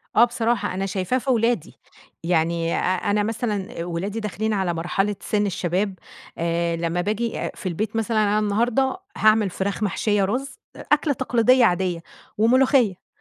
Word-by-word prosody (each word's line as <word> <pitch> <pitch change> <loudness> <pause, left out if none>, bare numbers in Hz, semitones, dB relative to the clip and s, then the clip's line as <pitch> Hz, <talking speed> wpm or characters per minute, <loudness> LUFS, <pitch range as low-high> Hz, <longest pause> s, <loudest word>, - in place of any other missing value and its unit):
آه 230 - +7
بصراحة، 235 -4 -1
أنا 190 +1 -2
شايفاه 190 +5 -1
في 265 - -4
ولادي. 230 -7 0 0.4
يعني 165 0 +1
أ - - 0
أنا 205 +3 0
مثلًا 210 -5 -3
ولادي 185 +5 -3
داخلين 215 0 -2
على 190 -4 0
مرحلة 195 +5 -1
سِن 210 -1 0
الشباب، 185 0 -1 0.4
آآ 170 0 0
لمّا 170 +1 -1
باجي 215 +4 -2
آآ - - -3
في 185 - -4
البيت 215 +7 -3
مثلًا 225 0 0
أنا 210 +1 +2
النهاردة 240 - +1 0.2
هاعمل 215 -1 +4
فراخ 195 +3 -3
محشية 205 0 +1
رز، 255 +8 -3 0.2
أكلة 300 0 +1
تقليدية 250 -1 +3
عادية 180 -3 +1 0.4
وملوخية. 235 -3 +3
205 Hz, 150 wpm, -23 LUFS, 180-230 Hz, 0.4 s, آه